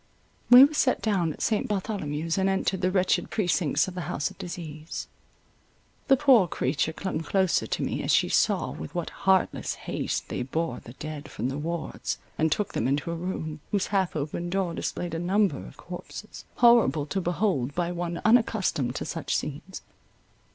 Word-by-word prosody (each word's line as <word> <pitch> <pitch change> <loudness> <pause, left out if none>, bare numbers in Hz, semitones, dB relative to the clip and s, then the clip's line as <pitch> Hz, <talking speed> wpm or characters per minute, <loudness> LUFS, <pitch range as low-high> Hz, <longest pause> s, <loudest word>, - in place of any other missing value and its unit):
We 245 +2 +11
were 285 +2 +4
set 270 -3 +2
down 190 -7 +1
at - - -6
St. 215 -2 +1
Bartholomew's, 165 -5 -2
and 190 0 +2
entered 190 -1 0
the 185 - +2
wretched 185 -1 +1
precincts 165 -6 +1
of 185 - -6
the 180 -3 -5
house 145 -4 -1
of - - -16
disease. 160 -3 -6 1.0
The 270 - +6
poor 250 -9 +5
creature 155 -1 0
clung 185 0 -3
closer 190 +2 +1
to - - -2
me, - - -2
as - - 0
she - - +4
saw - - +2
with 80 - -8
what 175 -2 -3
heartless 190 -1 +1
haste - - -3
they - - -3
bore 130 +1 -2
the 120 - -12
dead 150 +1 -7
from 125 - -3
the 135 - -4
wards, 165 +2 -3 0.2
and 160 0 +1
took 210 +6 -1
them 115 - 0
into 145 +5 0
a - - -2
room, 165 -3 -4
whose 200 -3 +1
half 190 -4 +1
opened 155 +4 -3
door 190 -3 0
displayed 175 0 -3
a 165 - -2
number 185 -3 +1
of - - -14
corpses, 180 +4 -9
horrible 230 - +5
to 190 +6 -2
behold 175 - 0
by 175 0 0
one 175 -1 -3
unaccustomed 215 - +2
to - - -3
such 165 0 -2
scenes. 155 +6 -6
175 Hz, 180 wpm, -27 LUFS, 155-195 Hz, 1.0 s, We